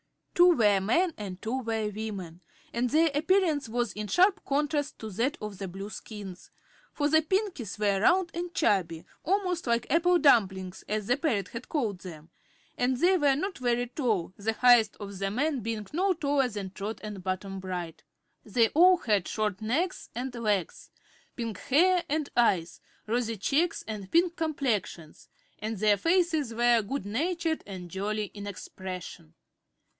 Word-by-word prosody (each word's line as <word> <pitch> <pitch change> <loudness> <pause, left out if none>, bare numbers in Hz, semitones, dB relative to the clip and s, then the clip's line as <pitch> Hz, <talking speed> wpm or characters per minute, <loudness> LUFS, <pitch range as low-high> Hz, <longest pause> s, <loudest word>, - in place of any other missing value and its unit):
Two 355 -1 +6
were 205 -4 +4
men 320 - +1
and 190 -3 -6
two 235 +6 -2
were 225 -3 -2
women, 190 -6 -6 0.3
and 245 +1 0
their 320 +3 +3
appearance 315 - +2
was 240 -1 -1
in 210 0 -5
sharp 380 - +3
contrast 290 +1 -1
to 220 -1 -7
that 235 +9 -1
of 210 -3 -7
the 195 - -4
Blueskins. 195 0 -8 0.4
For 290 - 0
the 315 +1 +4
Pinkies 370 - -2
were 200 -2 +1
round 355 - +3
and 345 +1 -4
chubby 175 - +1 0.2
almost 365 -3 0
like 235 0 +1
"apple 350 +3 +4
dumplings," 190 - +2
as 210 0 -1
the 245 +5 +2
parrot 230 - -1
had 230 +1 -8
called 225 - -1
them 165 -3 -11 0.4
and 250 +1 +1
they 360 +7 +4
were 290 -6 +3
not 375 +5 -3
very 245 -1 +1
tall, 230 - -1
the 220 +2 -1
highest 240 -3 +5
of 200 -2 -7
the 195 0 -1
men 280 +6 0
being 220 -1 -4
no 375 +4 +2
taller 285 -5 +1
than 200 -4 -6
Trot 210 +3 -5
or 215 - -5
Button 195 0 -4
Bright. 180 -3 -5 0.4
They 225 +1 +2
all 360 +4 +6
had 210 - 0
short 215 -2 -2
necks 310 +13 -1
and 250 +1 -4
legs, 210 -6 -2 0.5
pink 225 -5 -4
hair 350 - +3
and 300 0 0
eyes, 185 -8 +2 0.2
rosy 230 0 -1
cheeks 305 - 0
and 205 -3 -6
pink 340 +1 +3
complexions, 245 - -3 0.3
and 215 +1 -4
their 210 +1 +3
faces 325 - +1
were 240 0 +4
good 245 +3 -4
natured 325 - -1
and 180 -3 -8
jolly 210 +2 -2
in 205 -1 -7
expression. 185 - -8
230 Hz, 160 wpm, -28 LUFS, 200-305 Hz, 0.5 s, Two